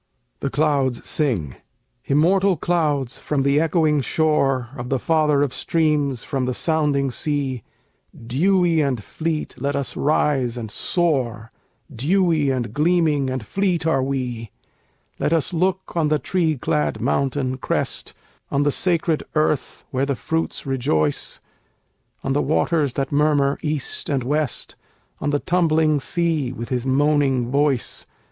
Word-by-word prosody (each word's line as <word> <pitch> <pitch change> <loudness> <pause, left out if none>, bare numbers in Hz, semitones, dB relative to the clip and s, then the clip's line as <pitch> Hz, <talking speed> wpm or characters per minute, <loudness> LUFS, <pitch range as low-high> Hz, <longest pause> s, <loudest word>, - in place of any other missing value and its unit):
THE 140 - -2
CLOUDS 135 -3 0
SING 110 - -1 0.5
Immortal 185 +6 +3
Clouds 145 -7 0
from 140 -3 -1
the 140 +1 +3
echoing 155 -2 +2
shore 135 -4 +1
Of 125 -1 -6
the 135 - +1
father 150 0 +2
of 135 -3 -2
streams 150 -5 0
from 135 -2 -2
the 125 -1 -2
sounding 145 -4 +1
sea, 140 -3 -2 0.6
Dewy 170 +5 +2
and 130 -7 -1
fleet, 160 +4 -3
let 140 +1 0
us 140 -2 -2
rise 135 -4 +1
and 110 -3 -5
soar; 125 - -1 0.4
Dewy 160 - +2
and 125 -3 -2
gleaming 150 -3 +2
and 130 -4 -3
fleet 180 - 0
are 160 -5 +2
we! 125 -4 -3 0.7
Let 160 - +1
us 165 +1 0
look 185 +2 -1
on 165 -3 +2
the 150 0 +2
tree 160 +1 0
clad 150 +4 -1
mountain 130 -1 0
crest, - - -2 0.3
On 140 +1 +1
the 145 - +2
sacred 170 -1 +1
earth 155 -3 0
where 135 +1 0
the 140 - 0
fruits 160 +6 -3
rejoice, 80 - -1 0.8
On 135 - 0
the 145 - +2
waters 155 -3 +1
that 135 +2 -2
murmur 145 -1 +2
east 150 -3 -3
and 135 -4 0
west, 145 0 -2 0.4
On 150 - -1
the 145 - +2
tumbling 160 -2 +2
sea 160 -3 0
with 120 -2 -7
his 125 0 -2
moaning 135 -3 +2
voice. 140 -3 0
145 Hz, 140 wpm, -22 LUFS, 130-160 Hz, 0.8 s, Immortal